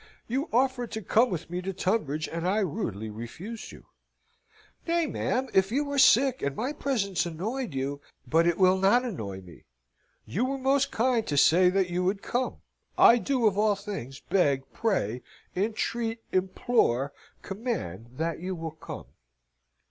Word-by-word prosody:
You 270 +7 -2
offered 250 0 +1
to 220 -1 -4
come 230 +6 +3
with 175 -3 -5
me 180 +1 -2
to 190 +1 -3
Tunbridge, 175 -6 -1
and 170 +1 -3
I 195 +3 +2
rudely 120 - -3
refused 160 - -8
you." - - -14 1.0
"Nay, 335 0 +2
ma'am, 265 -3 -1
if 190 +1 +3
you 280 +5 +1
were 285 -1 -1
sick, 260 +1 +5
and 140 -1 -1
my 255 - -2
presence 205 - -1
annoyed 195 - -4
you... 140 +2 -3 0.3
"But 165 +2 +3
it 170 - +2
will 185 0 +5
not 235 +7 +4
annoy 100 - -5
me! 90 -4 -15 0.6
You 215 - -1
were 275 +1 -2
most 270 +1 +2
kind 235 -1 +1
to 145 - -1
say 180 +6 +6
that 185 -1 +1
you 180 +1 0
would 195 +2 0
come. 250 +1 -2 0.4
I 240 - +7
do, 255 -2 0
of 205 -2 +3
all 210 -1 +3
things, 195 - -7
beg, 140 -8 +1
pray, 125 - 0 0.3
entreat, 225 +3 -1
implore, 185 - +1 0.3
command 195 - -4
that 165 0 -2
you 185 +2 -4
will 165 -1 -5
come." 155 0 -9
195 Hz, 165 wpm, -28 LUFS, 160-240 Hz, 1.0 s, I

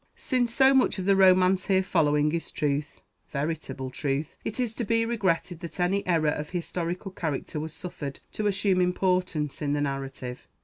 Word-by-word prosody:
Since 245 -3 0
so 265 +3 +5
much 265 -5 +3
of 185 - -3
the 195 0 +4
romance 185 0 +5
here 190 -2 +3
following 150 -4 +2
is 165 0 -3
truth, 145 0 -2 0.3
veritable 145 -3 -3
truth, 140 +3 -2
it 220 - -4
is 240 -3 0
to 235 - -3
be 230 +1 +2
regretted 190 -7 0
that 170 0 -8
any 190 +3 +1
error 165 -4 +3
of 150 0 -4
historical 180 +1 -3
character 155 -3 -3
was 155 +1 -4
suffered 150 -5 -6
to 215 - -1
assume 195 -2 +2
importance 180 -4 0
in 145 -1 0
the 145 - 0
narrative. 135 -3 -4
175 Hz, 175 wpm, -27 LUFS, 150-195 Hz, 0.3 s, so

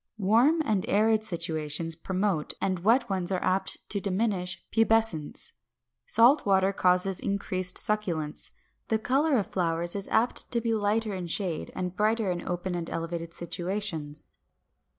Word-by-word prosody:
Warm 235 - +3
and 210 -6 +1
arid 215 +1 +3
situations 165 -4 -1
promote, 185 -1 -1
and 185 -2 -1
wet 235 +7 +3
ones 190 -2 -2
are 185 - -1
apt 190 +1 0
to 205 - 0
diminish 190 -2 -1
pubescence. 225 -8 +1 0.6
Salt 250 +6 +5
water 195 -1 +3
causes 180 0 +2
increased 185 -2 -2
succulence. 170 -8 -1 0.4
The 220 - +2
color 270 +6 +2
of 205 - 0
flowers 170 -1 -1
is 200 -1 -4
apt 230 +3 0
to 235 - +2
be 230 0 -1
lighter 215 0 0
in 180 -2 -4
shade, 170 -2 -2
and 180 0 -3
brighter 215 0 +1
in 175 -1 -3
open 180 +1 -2
and 170 -1 -3
elevated 165 0 -4
situations. 170 -3 -4
190 Hz, 145 wpm, -28 LUFS, 175-220 Hz, 0.6 s, Salt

